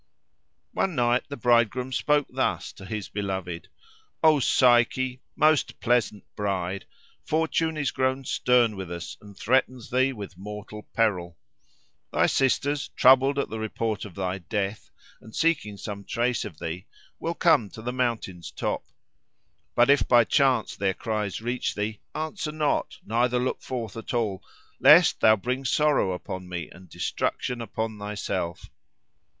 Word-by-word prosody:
One 190 -4 0
night 120 -1 +2
the 140 - -5
bridegroom 120 +2 +2
spoke 145 +2 +2
thus - - -1
to 95 - -12
his 105 0 -4
beloved, 95 -4 -4 0.6
"O 155 -2 +6
Psyche, 125 0 +3
most 155 -2 +2
pleasant 115 -4 +1
bride! 95 -2 -2 0.4
Fortune 160 0 0
is 140 -4 0
grown 130 0 0
stern 120 -4 +3
with 95 -3 -6
us, 85 -1 -6
and 100 -2 -14
threatens 130 0 0
thee 130 +2 +3
with 100 -6 -9
mortal 105 +1 -8
peril. 90 -7 0 0.7
Thy - - +3
sisters, 140 +2 +1
troubled 135 +2 +5
at 140 - -1
the 110 - -4
report 110 -1 -2
of 100 -5 -9
thy 95 0 -2
death 100 +2 -3 0.3
and 110 - -13
seeking 145 -11 +1
some 100 -1 -6
trace 120 +2 -1
of 75 - -8
thee, 85 +4 -5 0.3
will 170 +1 -2
come 155 - +3
to 110 - -11
the 125 +1 -3
mountain's 115 -9 -2
top. - - -3 0.9
But 120 +3 +5
if 140 - +3
by 120 -1 +6
chance 135 +2 +2
their 95 -2 0
cries 105 -3 -3
reach 120 +2 -2
thee, 105 +1 -3 0.2
answer 155 +1 -3
not, 150 -1 -1
neither 120 +3 +1
look 125 +1 -1
forth 115 -6 -5
at 115 +2 -5
all, 105 -6 -1 0.4
lest - - +7
thou 110 0 +6
bring 125 +6 -3
sorrow 140 -5 +2
upon 90 0 -6
me 85 -3 -5
and 90 0 -15
destruction 125 +8 -2
upon 110 -1 -4
thyself." 100 -4 -4
115 Hz, 145 wpm, -26 LUFS, 100-130 Hz, 0.9 s, lest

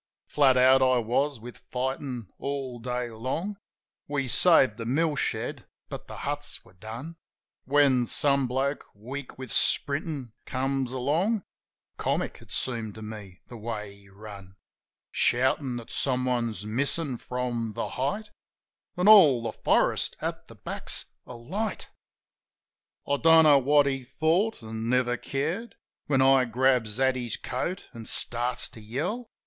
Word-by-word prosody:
Flat 135 -3 +4
out 130 +1 +6
I 130 -1 +4
was 125 +4 0
with 120 +2 -10
fightin' 130 -4 -3
all 135 -3 -4
day 125 0 -3
long 135 - -3 0.2
— - - -62
(We 135 -1 0
saved 130 -5 +4
the 115 - -5
mill 150 +4 +1
shed, - - -3 0.2
but - - -7
the - - -9
huts 145 +1 -4
were - - -19
done) 115 - -8 0.5
When 135 -3 +4
some 140 0 +2
bloke, 135 +3 -1
weak 130 +6 -8
with 130 0 -8
sprintin', 140 -3 0 0.2
comes 135 -1 -1
along 165 - 0 0.5
(Comic, - - -1
it - - -16
seemed 115 -5 -1
to 110 - -9
me, 105 -4 -9
the 120 - -10
way 105 -2 -5
he 100 -1 -20
run) 100 -2 -11 0.3
— - - -67
Shoutin' 130 +1 +2
that 120 +1 -9
someone's 125 -5 0
missin' 135 +3 -1
from 120 -3 -3
"The - - -3
Height," 145 +12 -2 0.7
An' 180 +2 +2
all 155 - +8
the 115 - -2
forest - - +1
at - - -4
the - - -13
back's - - -4 0.2
alight. 180 - -4 1.2
I 140 - +2
don't 165 +1 +7
know 145 -3 +7
what 145 +2 +4
he 135 -1 -1
thought, 160 - 0
an' 110 +1 -4
never 125 -1 +2
cared. 160 - -3 0.3
When 135 -2 +3
I 135 -1 +5
grabs 120 -2 +1
at 130 -1 +3
his 120 -3 -3
coat, 175 +9 -4
an' 115 -2 -9
starts 120 +3 -1
to 110 - -12
yell. 165 - -3
130 Hz, 145 wpm, -27 LUFS, 120-145 Hz, 1.2 s, all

